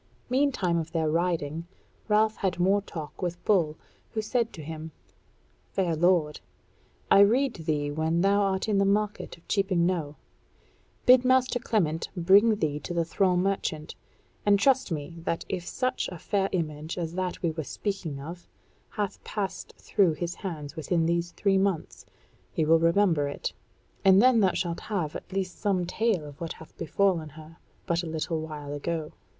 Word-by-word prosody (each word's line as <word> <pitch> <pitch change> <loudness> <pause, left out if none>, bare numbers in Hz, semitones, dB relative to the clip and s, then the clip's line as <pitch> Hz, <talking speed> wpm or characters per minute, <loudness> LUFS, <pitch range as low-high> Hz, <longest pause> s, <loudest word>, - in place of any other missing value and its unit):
Meantime 250 -11 +2
of 165 +1 -6
their 160 -2 +1
riding 165 -1 -1 0.4
Ralph 215 0 +3
had 185 -3 -1
more 195 +3 +3
talk 155 -5 -8
with 175 -1 -4
Bull, 170 -7 +2 0.4
who 220 - -1
said 230 +1 0
to 155 - -8
him: 160 +1 -6 0.8
"Fair 175 -4 +1
lord, 165 -2 +2 0.7
I - - +8
rede 225 - +3
thee 145 -2 0
when 160 +3 0
thou 200 +2 +3
art 195 0 0
in 205 -2 +2
the - - +4
market 210 0 0
of 170 - -25
Cheaping 190 -4 +2
Knowe, 165 -5 -1 0.9
bid 255 -1 +7
master 255 -1 +3
Clement 165 -9 0
bring 200 +6 +5
thee 150 -6 -1
to 175 +4 -6
the 170 -1 +1
thrall 180 +1 +2
merchant, 180 -4 -1 0.5
and 205 -1 +5
trust 260 0 +3
me 160 +2 -4
that 165 0 -3
if 180 -2 -4
such 255 0 -1
a 180 - -7
fair 195 +3 0
image 155 -2 -3
as 165 -2 -3
that 185 0 -3
we 170 - +2
were 160 0 -4
speaking 175 -4 -4
of 170 +5 -9 0.4
hath 205 -2 -4
passed 205 -3 -4
through 190 -6 +2
his 175 +2 -3
hands 155 -6 -6
within 165 +1 0
these 170 +1 0
three 195 -2 +2
months, 195 -4 -2 0.4
he 160 - 0
will 165 +1 +5
remember 165 -3 +3
it; 140 - -4 0.5
and 190 0 +7
then 250 +1 +6
thou 190 -4 +3
shalt 170 -1 -2
have 180 -8 -3
at - - -8
least 185 -2 -3
some 190 -3 +1
tale 210 -3 0
of 145 +1 -12
what 165 - -3
hath 160 - -15
befallen 170 -1 0
her 155 +2 -13 0.3
but 170 0 +1
a 175 - -6
little 160 0 -2
while 150 -2 -6
ago." 155 +1 -3
175 Hz, 170 wpm, -27 LUFS, 160-200 Hz, 0.9 s, I